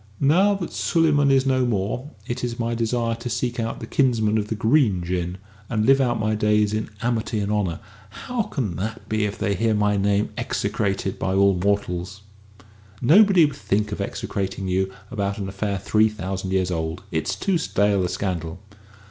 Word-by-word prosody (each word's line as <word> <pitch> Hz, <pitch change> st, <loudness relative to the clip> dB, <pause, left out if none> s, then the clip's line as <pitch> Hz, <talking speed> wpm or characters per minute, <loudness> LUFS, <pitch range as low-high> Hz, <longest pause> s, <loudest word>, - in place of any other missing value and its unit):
"Now 185 Hz, +9 st, +4 dB
that 185 Hz, -4 st, -5 dB
Suleyman 150 Hz, -4 st, +2 dB
is 135 Hz, -1 st, +4 dB
no 130 Hz, -1 st, +2 dB
more, 120 Hz, +4 st, -1 dB, 0.2 s
it 120 Hz, +1 st, -4 dB
is 120 Hz, -1 st, -2 dB
my 115 Hz, -1 st, -1 dB
desire 115 Hz, 0 st, 0 dB
to 120 Hz, +1 st, -5 dB
seek 125 Hz, 0 st, -2 dB
out 115 Hz, 0 st, -2 dB
my -, -, -6 dB
kinsmen 110 Hz, -4 st, +2 dB
of 105 Hz, -, -3 dB
the 110 Hz, -, -2 dB
Green 110 Hz, -, +2 dB
Jinn, 90 Hz, +1 st, -2 dB, 0.3 s
and 110 Hz, -1 st, 0 dB
live 135 Hz, +2 st, +5 dB
out 120 Hz, -3 st, +1 dB
my 110 Hz, 0 st, 0 dB
days 105 Hz, 0 st, +2 dB
in 110 Hz, 0 st, -2 dB
amity 115 Hz, -2 st, -1 dB
and 100 Hz, 0 st, -1 dB
honour. 100 Hz, -6 st, -1 dB, 0.3 s
How 250 Hz, -2 st, -3 dB
can 120 Hz, -, -3 dB
that 110 Hz, +4 st, -5 dB
be 110 Hz, -1 st, 0 dB
if 105 Hz, 0 st, -4 dB
they 100 Hz, -, 0 dB
hear 110 Hz, +3 st, +1 dB
my 105 Hz, 0 st, +2 dB
name 100 Hz, +1 st, +1 dB
execrated 100 Hz, -2 st, -2 dB
by 95 Hz, 0 st, -1 dB
all 100 Hz, 0 st, +5 dB
mortals?" 95 Hz, 0 st, -1 dB, 0.8 s
"Nobody 185 Hz, -, +6 dB
would 145 Hz, -1 st, -3 dB
think 105 Hz, -5 st, -1 dB
of 105 Hz, -, -4 dB
execrating 100 Hz, -1 st, -3 dB
you 95 Hz, +1 st, 0 dB, 0.2 s
about 100 Hz, -4 st, -2 dB
an 100 Hz, -2 st, -4 dB
affair 100 Hz, +1 st, -2 dB
three 110 Hz, +3 st, +2 dB
thousand 95 Hz, -2 st, -4 dB
years 95 Hz, -1 st, 0 dB
old. 80 Hz, +1 st, -3 dB
It's 80 Hz, -2 st, -1 dB
too 190 Hz, -4 st, 0 dB
stale 100 Hz, -9 st, +1 dB
a 90 Hz, -, -1 dB
scandal." 90 Hz, -3 st, -3 dB
105 Hz, 185 wpm, -23 LUFS, 95-120 Hz, 0.8 s, Nobody